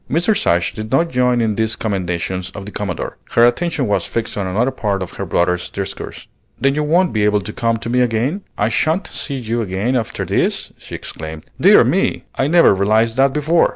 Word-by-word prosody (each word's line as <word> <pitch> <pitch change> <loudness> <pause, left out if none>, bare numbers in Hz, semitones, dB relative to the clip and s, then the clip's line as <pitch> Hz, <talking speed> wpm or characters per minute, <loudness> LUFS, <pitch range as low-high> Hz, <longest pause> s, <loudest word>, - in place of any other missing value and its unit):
Mrs. 175 +8 +1
Ashe 85 0 +2
did 110 +1 -6
not 165 +5 +2
join 125 -1 +2
in 110 -2 +1
these 110 +1 -1
commendations 90 -3 -2
of 100 - -7
the 105 - -8
Commodore; 100 -5 -4 0.2
her 115 - +7
attention 150 +3 +1
was 105 -2 +1
fixed 115 -1 -3
on 100 -2 -2
another 115 +8 +1
part 100 -6 -2
of 90 - -8
her - - -4
brother's 90 0 0
discourse. - - -6 0.3
"Then 135 0 +2
you 150 - 0
won't 170 +4 +2
be 105 -1 +1
able 105 0 +3
to 105 +2 -7
come 115 -1 0
to 115 - -7
me 125 +2 +1
again? 125 - 0 0.2
I 105 - +1
sha'n't 160 - +1
see 140 - -4
you 120 -2 -2
again 105 +5 -1
after 115 -3 -2
this!" - - -1
she - - -8
exclaimed. 80 0 -7 0.2
"Dear - - +7
me! - - 0
I 135 - 0
never 170 -7 +6
realized 110 +4 +2
that 135 0 +4
before. 155 +4 +2
115 Hz, 210 wpm, -18 LUFS, 100-135 Hz, 0.3 s, her